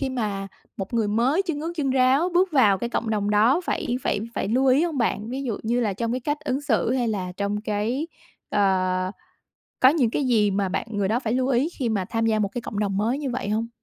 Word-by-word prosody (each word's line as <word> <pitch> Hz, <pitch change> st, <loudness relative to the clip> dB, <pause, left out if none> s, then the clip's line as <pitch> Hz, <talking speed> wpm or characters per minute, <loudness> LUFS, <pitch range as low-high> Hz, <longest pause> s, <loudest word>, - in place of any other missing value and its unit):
khi 275 Hz, -, -1 dB
mà 210 Hz, -6 st, -3 dB, 0.3 s
một 195 Hz, +4 st, -5 dB
người 225 Hz, -3 st, +1 dB
mới 245 Hz, -, +2 dB
chân 330 Hz, -6 st, -3 dB
ướt 330 Hz, +2 st, -3 dB
chân 280 Hz, -4 st, 0 dB
ráo 265 Hz, +6 st, +3 dB
bước 360 Hz, 0 st, +3 dB
vào 210 Hz, -9 st, +4 dB
cái 235 Hz, +3 st, -3 dB
cộng 230 Hz, -1 st, -2 dB
đồng 205 Hz, -1 st, 0 dB
đó 225 Hz, +10 st, +4 dB
phải 245 Hz, -, -1 dB
phải 205 Hz, -, 0 dB
phải -, -, -2 dB
lưu 255 Hz, +5 st, +2 dB
ý 265 Hz, +5 st, +4 dB
hông 325 Hz, -5 st, -2 dB
bạn? 225 Hz, -2 st, 0 dB
Ví 260 Hz, +3 st, -4 dB
dụ 230 Hz, -5 st, -2 dB
như 235 Hz, +2 st, 0 dB
là 215 Hz, -4 st, 0 dB
trong 230 Hz, +4 st, -3 dB
cái 255 Hz, -, -2 dB
cách 295 Hz, +4 st, -2 dB
ứng 275 Hz, -2 st, -2 dB
xử, 245 Hz, -5 st, +1 dB
hay 250 Hz, -2 st, 0 dB
là 185 Hz, -4 st, -3 dB
trong 205 Hz, +1 st, -1 dB
cái, 220 Hz, +8 st, -2 dB, 0.4 s
ờ 185 Hz, -2 st, +1 dB, 0.7 s
có 260 Hz, -, +7 dB
những 275 Hz, -6 st, +2 dB
cái 280 Hz, -, -1 dB
gì 215 Hz, -5 st, +3 dB
mà 195 Hz, 0 st, 0 dB
bạn 195 Hz, -, -2 dB
người 205 Hz, -2 st, 0 dB
đó 225 Hz, +4 st, +1 dB
phải 230 Hz, -3 st, -2 dB
lưu 255 Hz, +1 st, +1 dB
ý 270 Hz, +4 st, +2 dB
khi 250 Hz, -4 st, 0 dB
mà 200 Hz, -4 st, -1 dB
tham 225 Hz, +3 st, -1 dB
gia 220 Hz, -1 st, +2 dB
một 200 Hz, -2 st, 0 dB
cái 245 Hz, -, -4 dB
cộng 205 Hz, -, -5 dB
đồng 200 Hz, -2 st, -1 dB
mới 230 Hz, +7 st, 0 dB
như 280 Hz, -3 st, -3 dB
vậy 235 Hz, -4 st, -3 dB
hông? 220 Hz, +2 st, 0 dB
230 Hz, 255 wpm, -24 LUFS, 205-265 Hz, 0.7 s, có